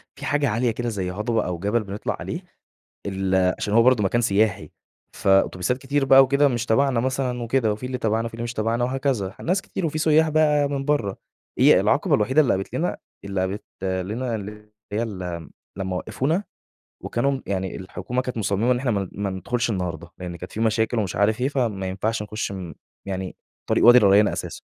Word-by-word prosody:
في -, -, -8 dB
حاجة 145 Hz, -2 st, +1 dB
عالية 115 Hz, +2 st, +1 dB
كده 120 Hz, +1 st, -3 dB
زي 95 Hz, -4 st, -3 dB
هضبة 110 Hz, +4 st, -1 dB
أو 90 Hz, -2 st, -3 dB
جبل 105 Hz, +4 st, 0 dB
بنطلع 100 Hz, +1 st, -4 dB
عليه، -, -, -5 dB, 0.7 s
ال 95 Hz, -1 st, +1 dB
عشان 105 Hz, -, -2 dB
هو 115 Hz, -, +6 dB
برضه 125 Hz, -4 st, +4 dB
مكان 120 Hz, +5 st, +2 dB
سياحي، 110 Hz, -1 st, +1 dB, 0.5 s
فأتوبيسات 95 Hz, +4 st, +2 dB
كتير 140 Hz, +1 st, 0 dB
بقى 135 Hz, 0 st, +8 dB
وكده 140 Hz, +2 st, +3 dB
مش 120 Hz, -2 st, -2 dB
تبعنا 130 Hz, +1 st, +2 dB
مثلًا 125 Hz, -1 st, -1 dB
وكده 115 Hz, -2 st, +1 dB
وفي 110 Hz, +4 st, -5 dB
اللي 125 Hz, 0 st, -3 dB
تبعنا 110 Hz, +1 st, 0 dB
وفي 115 Hz, -, -7 dB
اللي 115 Hz, -, -5 dB
مش 120 Hz, +1 st, -4 dB
تبعنا 115 Hz, +2 st, 0 dB
وهكذا، 125 Hz, -7 st, -1 dB
ناس 190 Hz, +3 st, 0 dB
كتير 180 Hz, -, -3 dB
وفي 155 Hz, 0 st, -3 dB
سُيّاح 155 Hz, 0 st, +4 dB
بقى 150 Hz, -2 st, +3 dB
من 140 Hz, -1 st, -3 dB
برّه، 125 Hz, -10 st, 0 dB, 0.4 s
هي -, -, +6 dB
العقبة -, -, +2 dB
الوحيدة 130 Hz, +8 st, +3 dB
اللي 140 Hz, -, +3 dB
قابلت 95 Hz, 0 st, -3 dB
لنا -, -, -1 dB, 0.3 s
اللي 100 Hz, -1 st, -2 dB
قابت 95 Hz, +3 st, -3 dB, 0.2 s
لنا 100 Hz, +6 st, -2 dB
اللي 105 Hz, 0 st, -8 dB, 0.2 s
هي 110 Hz, +3 st, 0 dB
ال 90 Hz, -6 st, -5 dB, 0.3 s
لمّا 95 Hz, -1 st, -2 dB
وقّفونا 160 Hz, -, -1 dB, 0.6 s
وكانوا 135 Hz, +4 st, 0 dB
م 135 Hz, -, -4 dB
يعني 95 Hz, -2 st, -2 dB
الحكومة 120 Hz, +6 st, -4 dB
كانت 125 Hz, -1 st, -5 dB
مصمّمة 105 Hz, +3 st, +1 dB
إن 125 Hz, -, 0 dB
إحنا 125 Hz, -1 st, -1 dB
ما 100 Hz, -3 st, -1 dB
ما 100 Hz, 0 st, -3 dB
ندخلش 115 Hz, +6 st, -2 dB
النهارده، 85 Hz, -4 st, -4 dB
لإن 90 Hz, -1 st, -6 dB
كانت 90 Hz, +2 st, -9 dB
في 110 Hz, -, -5 dB
مشاكل 110 Hz, +1 st, +1 dB
ومش 95 Hz, -5 st, -2 dB
عارف 105 Hz, +4 st, +2 dB
إيه، 130 Hz, -, +2 dB
فما 115 Hz, -9 st, -1 dB
ينفعش 105 Hz, +4 st, -2 dB
نخُش 105 Hz, -1 st, -4 dB
م 90 Hz, -4 st, -7 dB, 0.3 s
يعني 95 Hz, -1 st, -4 dB, 0.3 s
طريق -, -, +2 dB
وادي 120 Hz, +1 st, +9 dB
الريّان 105 Hz, -1 st, +5 dB
اساسًا. -, -, -5 dB
110 Hz, 195 wpm, -23 LUFS, 95-125 Hz, 0.7 s, وادي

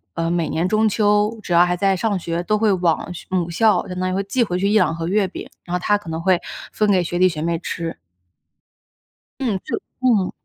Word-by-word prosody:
呃， 165 Hz, 0 st, -1 dB
每 170 Hz, -2 st, 0 dB
年 165 Hz, +3 st, 0 dB
中 215 Hz, +2 st, +2 dB
秋 210 Hz, +1 st, +2 dB
只 175 Hz, -, -2 dB
要 170 Hz, +1 st, +6 dB
还 180 Hz, 0 st, 0 dB
在 195 Hz, +1 st, +2 dB
上 205 Hz, +1 st, 0 dB
学， 170 Hz, 0 st, -3 dB
都 215 Hz, +4 st, +1 dB
会 215 Hz, -1 st, +2 dB
往 175 Hz, -1 st, 0 dB
学 175 Hz, -, -10 dB
母 180 Hz, -2 st, -1 dB
校， 215 Hz, +5 st, +2 dB
相 180 Hz, 0 st, -5 dB
当 185 Hz, 0 st, 0 dB
于 -, -, -2 dB
会 195 Hz, -, 0 dB
寄 240 Hz, +5 st, +1 dB
回 180 Hz, -5 st, -2 dB
去 200 Hz, -, +1 dB
1-2 210 Hz, -6 st, +3 dB
盒 165 Hz, 0 st, -4 dB
月 200 Hz, +2 st, +2 dB
饼， 185 Hz, -, -8 dB, 0.2 s
然 175 Hz, -, -6 dB
后 -, -, 0 dB
她 205 Hz, +3 st, +2 dB
可 205 Hz, -5 st, -11 dB
能 160 Hz, +1 st, -3 dB
会 185 Hz, -1 st, +3 dB, 0.3 s
分 210 Hz, -1 st, +1 dB
给 185 Hz, -2 st, +3 dB
学 175 Hz, +1 st, -3 dB
弟 185 Hz, 0 st, +5 dB
学 155 Hz, -3 st, -5 dB
妹 170 Hz, +1 st, 0 dB
吃。 165 Hz, -1 st, -5 dB, 1.4 s
嗯， 235 Hz, -7 st, 0 dB
就 -, -, -3 dB, 0.2 s
嗯。 225 Hz, -8 st, +2 dB
185 Hz, 245 characters per minute, -21 LUFS, 170-210 Hz, 1.4 s, 要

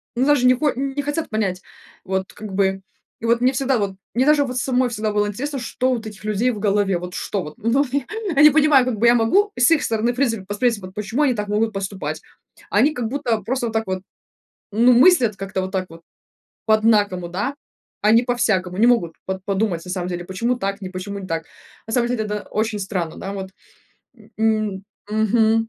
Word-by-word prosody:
ну, 250 Hz, +2 st, +2 dB
даже 290 Hz, -3 st, +3 dB
не 255 Hz, -, +6 dB
хо 295 Hz, +2 st, +1 dB
не 275 Hz, +2 st, -2 dB
хотят 290 Hz, +3 st, -2 dB
понять. 195 Hz, -4 st, -1 dB, 0.4 s
Вот 190 Hz, 0 st, -3 dB
как 210 Hz, -2 st, -8 dB
бы, 190 Hz, 0 st, +1 dB, 0.4 s
и -, -, -6 dB
вот 235 Hz, +1 st, +2 dB
мне 255 Hz, +1 st, +4 dB
всегда, 270 Hz, -1 st, +1 dB
вот 200 Hz, -3 st, -2 dB, 0.2 s
мне 255 Hz, +2 st, +3 dB
даже 300 Hz, -1 st, +5 dB
вот 255 Hz, -1 st, -4 dB
самой 255 Hz, 0 st, +1 dB
всегда 215 Hz, -2 st, -2 dB
было 210 Hz, 0 st, +1 dB
интересно, 270 Hz, +7 st, -4 dB
что 255 Hz, +1 st, -1 dB
вот 235 Hz, -2 st, -4 dB
у -, -, -4 dB
этих 210 Hz, -1 st, -14 dB
людей 215 Hz, +3 st, +1 dB
в 215 Hz, -, -6 dB
голове. 200 Hz, -2 st, +1 dB
Вот 180 Hz, +1 st, -7 dB
что 195 Hz, +1 st, -3 dB
вот, 150 Hz, -, -8 dB
ну, 235 Hz, +6 st, +2 dB, 0.5 s
я 275 Hz, -, +5 dB
не 300 Hz, -, +10 dB
понимаю. 295 Hz, -3 st, +4 dB
Как 250 Hz, -4 st, -2 dB
бы 225 Hz, -, +1 dB
я 235 Hz, -, +7 dB
могу 385 Hz, -, +3 dB
с 245 Hz, +1 st, +5 dB
их 330 Hz, -, +4 dB
стороны, 230 Hz, +2 st, 0 dB
в -, -, -12 dB
принципе, 235 Hz, -6 st, 0 dB
посмотреть, 210 Hz, +3 st, 0 dB
вот 185 Hz, -1 st, -10 dB
почему 210 Hz, +6 st, -2 dB
они 270 Hz, -4 st, +3 dB
так 210 Hz, -1 st, -3 dB
могут 220 Hz, +2 st, +1 dB
поступать. 190 Hz, -6 st, -4 dB, 0.5 s
А -, -, +1 dB
они 280 Hz, +8 st, +4 dB
как 245 Hz, -6 st, -3 dB
будто 235 Hz, -3 st, -1 dB
просто 245 Hz, +3 st, -1 dB
вот 225 Hz, -, -5 dB
так 220 Hz, 0 st, +1 dB
вот, 185 Hz, 0 st, -3 dB, 0.7 s
ну, 235 Hz, +4 st, +5 dB
мыслят 250 Hz, -, +5 dB
как-то 195 Hz, 0 st, -4 dB
вот 185 Hz, 0 st, -4 dB
так 190 Hz, -1 st, -1 dB
вот 165 Hz, 0 st, -13 dB, 0.6 s
по-однакому, 210 Hz, -5 st, +2 dB
да. 205 Hz, +11 st, -3 dB, 0.5 s
А 210 Hz, -, +6 dB
не 230 Hz, +2 st, +5 dB
по-всякому, 215 Hz, -7 st, 0 dB
не 220 Hz, -, +4 dB
могут 195 Hz, -10 st, +2 dB
вот 190 Hz, 0 st, -2 dB
по 200 Hz, -, 0 dB
подумать 190 Hz, -4 st, -1 dB
на -, -, -9 dB
самом 180 Hz, -1 st, -3 dB
деле, 175 Hz, -1 st, -4 dB
почему 230 Hz, +7 st, -1 dB
так, 200 Hz, -2 st, -3 dB
не 190 Hz, -, -5 dB
почему 190 Hz, +2 st, -6 dB
не 195 Hz, -, -7 dB
так. 165 Hz, -2 st, -3 dB, 0.4 s
На 225 Hz, -, -5 dB
самом 240 Hz, 0 st, +2 dB
деле 235 Hz, -3 st, -1 dB
это 210 Hz, 0 st, -3 dB
очень 215 Hz, 0 st, -1 dB
странно, 185 Hz, -5 st, -3 dB
да. 195 Hz, -, -6 dB
Вот, 190 Hz, -1 st, -6 dB, 0.7 s
м 220 Hz, -1 st, -20 dB, 0.4 s
м. 190 Hz, 0 st, -9 dB, 0.3 s
Мгм. 220 Hz, +1 st, +2 dB
220 Hz, 225 wpm, -21 LUFS, 195-245 Hz, 0.7 s, не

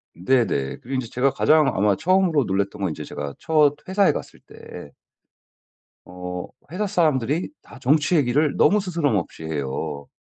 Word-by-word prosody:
네네. 90 Hz, -, 0 dB
그리고 120 Hz, -, -18 dB
인제 130 Hz, -3 st, -2 dB
제가 125 Hz, +4 st, +1 dB
가장 155 Hz, -2 st, +3 dB
아마 100 Hz, 0 st, +2 dB
처음으로 180 Hz, -, +2 dB
놀랐던 100 Hz, +1 st, -2 dB
건 95 Hz, -, 0 dB
인제 75 Hz, -1 st, -6 dB
제가 70 Hz, -1 st, -6 dB
첫 150 Hz, -2 st, +3 dB
회사에 195 Hz, +1 st, +3 dB
갔을 -, -, -7 dB
때 -, -, -12 dB, 1.1 s
어 90 Hz, 0 st, -6 dB, 0.2 s
회사 205 Hz, +3 st, -2 dB
사람들이 155 Hz, -, +1 dB
다 -, -, -15 dB
정치 150 Hz, +6 st, +2 dB
얘기를 145 Hz, +1 st, +2 dB
너무 210 Hz, -, +4 dB
스스럼없이 145 Hz, -, -2 dB
해요. 70 Hz, -1 st, -4 dB
130 Hz, 315 characters per minute, -23 LUFS, -, 1.1 s, 너무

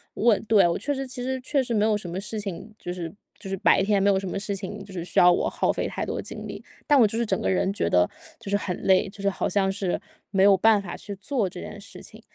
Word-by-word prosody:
问， 225 Hz, -2 st, +3 dB
对 215 Hz, -5 st, +5 dB
我 170 Hz, -, 0 dB
确 285 Hz, +8 st, -1 dB
实 270 Hz, -1 st, -4 dB
其 250 Hz, -1 st, -6 dB
实 260 Hz, 0 st, -2 dB
确 275 Hz, +1 st, +1 dB
实 245 Hz, -2 st, -3 dB
没 210 Hz, -, +2 dB
有 215 Hz, -1 st, +3 dB
什 200 Hz, -, -7 dB
么 180 Hz, -, -4 dB
事 210 Hz, +1 st, -4 dB
情， 200 Hz, +1 st, -6 dB
就 175 Hz, -, -5 dB
是 170 Hz, -3 st, -5 dB, 0.3 s
就 195 Hz, -, -8 dB
是 195 Hz, -, -1 dB
白 190 Hz, -, +4 dB
天 200 Hz, 0 st, +2 dB
没 -, -, +3 dB
有 195 Hz, -, +3 dB
什 195 Hz, -, -5 dB
么 -, -, -3 dB
事 200 Hz, 0 st, -3 dB
情 195 Hz, +1 st, -6 dB
就 195 Hz, -, -12 dB
是 175 Hz, -2 st, -4 dB
需 -, -, +1 dB
要 180 Hz, 0 st, +8 dB
我 -, -, +1 dB
耗 -, -, +1 dB
费 -, -, -2 dB
太 -, -, -4 dB
多 -, -, -3 dB
精 -, -, -7 dB
力， -, -, -8 dB, 0.2 s
但 290 Hz, -2 st, +5 dB
我 230 Hz, -, +7 dB
就 220 Hz, +2 st, -3 dB
是 235 Hz, -, +1 dB
整 195 Hz, -3 st, 0 dB
个 -, -, -1 dB
人 190 Hz, +1 st, +1 dB
觉 85 Hz, -, 0 dB
得 90 Hz, +1 st, +4 dB, 0.3 s
就 -, -, -8 dB
是 205 Hz, -, +3 dB
很 185 Hz, -3 st, -3 dB
累， 190 Hz, +1 st, +4 dB
就 200 Hz, -, -10 dB
是 200 Hz, -, +2 dB
好 195 Hz, -, -2 dB
像 195 Hz, -1 st, +2 dB
是 195 Hz, -2 st, -1 dB, 0.3 s
没 190 Hz, -1 st, +3 dB
有 200 Hz, 0 st, +7 dB
办 220 Hz, +2 st, +5 dB
法 175 Hz, -3 st, -7 dB
去 200 Hz, -1 st, -7 dB
做 205 Hz, 0 st, -1 dB
这 180 Hz, 0 st, -9 dB
件 -, -, -8 dB
事 200 Hz, -, -10 dB
情。 -, -, -12 dB
200 Hz, 320 characters per minute, -25 LUFS, 190-220 Hz, 0.3 s, 要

